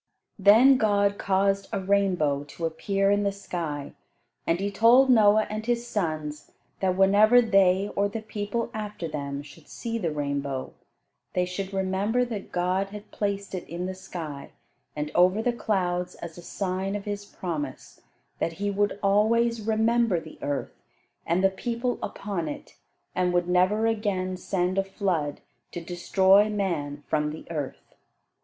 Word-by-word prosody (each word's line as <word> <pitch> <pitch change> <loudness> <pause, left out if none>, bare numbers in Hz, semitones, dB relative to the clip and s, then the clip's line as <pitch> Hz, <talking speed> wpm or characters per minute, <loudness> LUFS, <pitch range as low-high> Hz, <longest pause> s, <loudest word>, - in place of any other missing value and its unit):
Then 225 +7 +7
God 200 -3 +2
caused 195 0 +1
a 200 - -1
rainbow 185 -7 +1
to 165 +3 -6
appear 195 +5 0
in 205 0 +3
the 200 -1 +1
sky, 165 -7 -5 0.5
and 165 - +2
he 200 +1 -1
told 245 +5 +6
Noah 215 -2 +5
and 215 +1 -4
his 240 +1 -1
sons 155 -9 -3 0.3
that 185 -1 0
whenever 205 +5 +6
they 195 -3 +3
or 200 0 +2
the 220 +1 -5
people 210 +2 -3
after 210 -5 -5
them 140 -2 -4
should 150 +2 -15
see 230 -1 -4
the 175 -6 -1
rainbow, 140 -3 -3 0.6
they 180 - +1
should 190 +2 -5
remember 195 +5 0
that 220 -5 -6
God 185 +2 0
had 210 0 -10
placed 200 -1 -3
it 185 - -5
in 175 +2 -4
the 190 - -3
sky 170 -6 -7 0.5
and 150 0 -3
over 185 +4 +4
the 240 +2 +1
clouds 180 -5 -1
as 170 -2 -8
a 175 - -10
sign 190 +2 -3
of 205 - -5
his 205 -1 -4
promise, 155 -9 -6 0.4
that 165 - -1
he 200 +4 -2
would 205 0 0
always 225 +3 +3
remember 220 -2 +2
the 160 -1 -12
earth, 145 -2 -4 0.5
and 175 +3 +1
the 195 - +5
people 240 +5 -2
upon 200 -5 -4
it, 150 - -8 0.4
and 180 -1 +1
would 175 0 +2
never 185 +5 +3
again 200 -5 0
send 185 0 -1
a - - +2
flood 185 -7 -2 0.3
to - - -5
destroy 190 +4 +3
man 160 -9 -2
from 150 -1 0
the 155 +1 -8
earth. 150 -5 -5
195 Hz, 160 wpm, -26 LUFS, 175-210 Hz, 0.6 s, Then